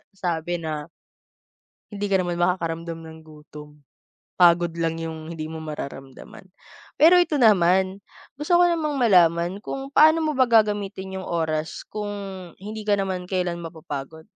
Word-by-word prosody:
sabi 175 -2 -2
na 155 -1 -4 1.0
Hindi 205 0 -4
ka 195 -2 +2
naman 175 -1 -3
makakaramdam 170 -2 -1
ng 160 0 -11
gutom, 150 -1 -14 0.5
pagod 175 -1 +4
lang 165 0 0
yung 160 -1 -6
hindi 165 -2 -6
mo 160 +1 -7
mararamdaman. 140 +2 -9 0.5
Pero 350 +3 +7
eto 330 -3 +1
naman, 190 -5 +3 0.3
gusto 300 +5 +1
ko 355 - +5
namang 320 -4 0
malaman, 180 -5 +3
kung 270 +5 -6
paano 315 +2 +5
mo 310 - 0
ba 260 -3 +2
gagamitin 200 -4 +1
yung - - -8
oras 160 -2 -2
kung 210 -1 -6 0.5
hindi 215 +3 -7
ka 205 - +4
naman 185 -2 -3
kelan 180 -2 -2
mapapagod? 160 -2 -8
180 Hz, 140 wpm, -23 LUFS, 160-210 Hz, 1.0 s, Pero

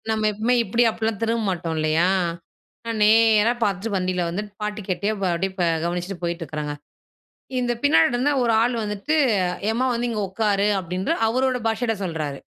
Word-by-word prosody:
நம்ம 215 -1 +1
எப்பவுமே 220 +4 0
இப்பிடி 230 +2 +1
அப்டிலாம் 220 -2 -2
திரும்ப 230 0 0
மாட்டோம் 170 -3 -3
இல்லையா? 155 +3 +2 0.8
நான் 225 -2 -3
நேரா 220 0 +5
பார்த்துட்டு 205 +1 -1
வண்டில 185 -1 -1
வந்துட்டு 205 +4 -5
பாட்டு 210 0 -3
கேட்டே 200 +3 0
வ - - 0
அப்பிடியே 190 +3 -1
ப - - +2 0.2
கவனிச்சுட்டு 175 +2 -3
போயிட்டு 170 0 -2
இருக்கிறங்க. 150 -1 -4 0.9
இந்த 245 -1 0
பின்னாடி 165 -13 +4
இருந்த 250 +4 +1
ஒரு 230 - +2
ஆள் 245 +1 +1
வந்துட்டு 210 +9 -2 0.5
ஏம்மா, 240 +4 0
வந்து 240 +1 -1
இங்க 220 -2 -2
உக்காரு 205 0 +1
அப்பிடின்ற 180 +2 -2 0.2
அவரோட 255 +2 +1
பாஷையில 225 +1 0
சொல்றாரு. 155 -5 -3
210 Hz, 165 wpm, -23 LUFS, 180-230 Hz, 0.9 s, நேரா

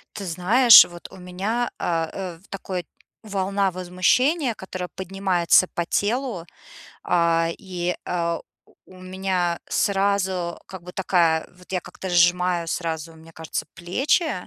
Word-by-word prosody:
Ты 200 - -6
знаешь, 210 +8 +7
вот 175 -1 -11
у - - -12
меня, 195 +7 -2
э, 165 -2 -1
э, 185 -4 -6
в 190 - -24
такой 185 -2 -5 0.4
волна 195 -1 -1
возмущения, 225 - +1
которая 185 -1 -6
поднимается 185 -2 +2
по 170 - -3
телу. 215 -1 -1 0.6
А, 170 -1 +2
и, 180 -2 -3
а, 170 -1 -1 0.5
у 185 0 -15
меня 185 -2 -2
сразу 195 -3 0
как 190 -2 -10
бы 180 - -9
такая, 170 -4 +1
вот 180 +1 -15
я 185 - 0
как-то 190 - -9
сжимаю 175 0 +2
сразу, 165 -1 -4
мне 160 +1 -16
кажется, 160 0 -5
плечи, 270 - 0
180 Hz, 135 wpm, -23 LUFS, 170-195 Hz, 0.6 s, знаешь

